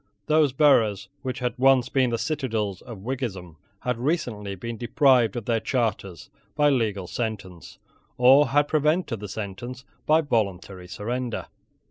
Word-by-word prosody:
Those 155 -2 +3
boroughs 110 -8 +3
which 130 0 -4
had 125 -2 -2
once 130 -1 +4
been 130 -2 +1
the 115 - -1
citadels 115 - -2
of 115 -6 -10
Whiggism 100 -10 -5 0.2
had 125 -2 -2
recently 120 - -2
been 115 +5 -6
deprived 120 -1 +3
of 120 -3 -4
their 115 -1 +1
charters 110 - -3 0.2
by 150 -1 +4
legal 105 -7 0
sentence, 100 -4 -6 0.4
or 130 +4 +6
had 145 +2 +2
prevented 150 - 0
the 105 -1 -7
sentence 115 +6 -7 0.2
by 155 +1 +5
voluntary 100 - -2
surrender. 120 +5 -4
120 Hz, 140 wpm, -25 LUFS, 105-135 Hz, 0.4 s, or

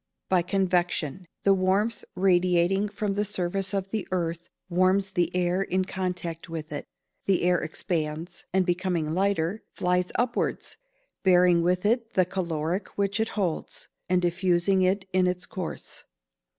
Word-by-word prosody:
_ - - -57
By 185 -2 +4
convection. 180 -3 0 0.2
The 200 - +5
warmth 195 +4 +1
radiating 180 +1 +3
from 205 0 -2
the 205 +1 0
surface 195 -1 -1
of 195 -1 -2
the 215 -3 -2
earth 170 -2 -2 0.2
warms 185 +2 +2
the 175 -3 +1
air 180 +1 +1
in 185 -1 0
contact 180 -3 -4
with 160 -2 -6
it; 145 - -5 0.4
the 195 -3 +2
air 180 0 +3
expands, 160 +1 -3
and 190 0 +2
becoming 175 -3 0
lighter, 195 +1 0
flies 180 0 +1
upwards, 245 0 -1 0.5
bearing 180 -2 +5
with 180 +2 +1
it 230 +1 +1
the 185 - +4
caloric 175 0 -2
which 200 +1 0
it 220 0 +1
holds, 180 -6 -2 0.2
and 180 0 +2
diffusing 180 +2 +2
it 190 +1 +1
in 185 -1 +4
its 180 0 -1
course. 185 -4 -6
185 Hz, 150 wpm, -27 LUFS, 175-195 Hz, 0.5 s, The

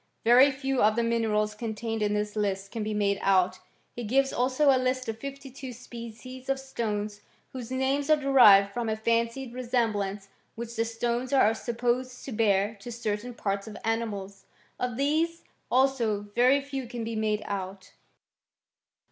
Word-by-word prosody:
Very 245 +4 +7
few 270 -1 -1
of 215 +1 +4
the 235 - +1
minerals 220 -2 +1
contained 225 0 -4
in 210 0 +1
this 210 0 -2
list 195 -2 -2
can 225 - -4
be 215 0 -2
made 200 -1 +1
out. 185 -1 +2 0.4
He 240 - -5
gives 270 +5 +2
also 260 +4 +3
a 260 - +3
list 255 0 -1
of 225 0 -4
fifty 275 +1 -7
two 265 0 -8
species 245 +2 -10
of 270 0 +1
stones, 210 -5 -3 0.3
whose 250 -3 -6
names 265 +3 0
are 310 - +7
derived 215 -9 +6
from 235 -2 -2
a 220 - 0
fancied 230 +3 -1
resemblance 215 -6 -1 0.3
which 235 0 -6
the 225 - +1
stones 235 +2 -2
are 245 -6 +5
supposed 245 +2 -2
to 270 - -6
bear 210 -2 +2
to 240 +5 -8
certain 230 +1 -3
parts 200 -1 -2
of 215 - -8
animals. 205 -4 -3 0.3
Of 250 -2 -2
these, 315 +4 0 0.3
also, 250 -5 +2
very 255 +4 +5
few 270 -2 -5
can 240 -1 -5
be 225 0 -4
made 215 -1 0
out. 190 -1 -5
230 Hz, 165 wpm, -28 LUFS, 210-255 Hz, 0.4 s, Very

